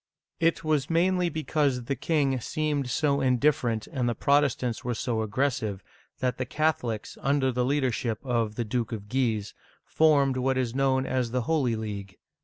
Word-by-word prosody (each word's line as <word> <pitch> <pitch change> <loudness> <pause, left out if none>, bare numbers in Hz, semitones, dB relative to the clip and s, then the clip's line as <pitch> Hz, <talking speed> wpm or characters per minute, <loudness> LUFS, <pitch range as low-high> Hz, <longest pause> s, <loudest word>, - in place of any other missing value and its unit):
It 165 0 +2
was 155 -3 0
mainly 180 +1 +2
because 150 -5 0
the 135 +4 -2
king 140 -1 +1
seemed 150 -1 -1
so 140 +1 +1
indifferent 125 -4 +1
and 125 -6 -1
the 120 - -1
Protestants 140 -3 +1
were 120 -1 -2
so 110 0 -1
aggressive, 110 -3 -1 0.4
that 125 -1 -1
the - - +1
Catholics, 125 -8 -1
under 135 -1 +2
the 125 0 0
leadership 125 -4 0
of 115 -4 0
the 120 - -2
Duke 115 +1 -2
of 105 -3 -6
Guise, 115 -5 0 0.3
formed 140 -4 +3
what 130 +1 +1
is 125 -3 -1
known 135 0 +2
as 130 -3 -1
the 125 +2 -1
Holy 130 -3 +1
League. 100 -3 -6
130 Hz, 165 wpm, -27 LUFS, 115-145 Hz, 0.4 s, formed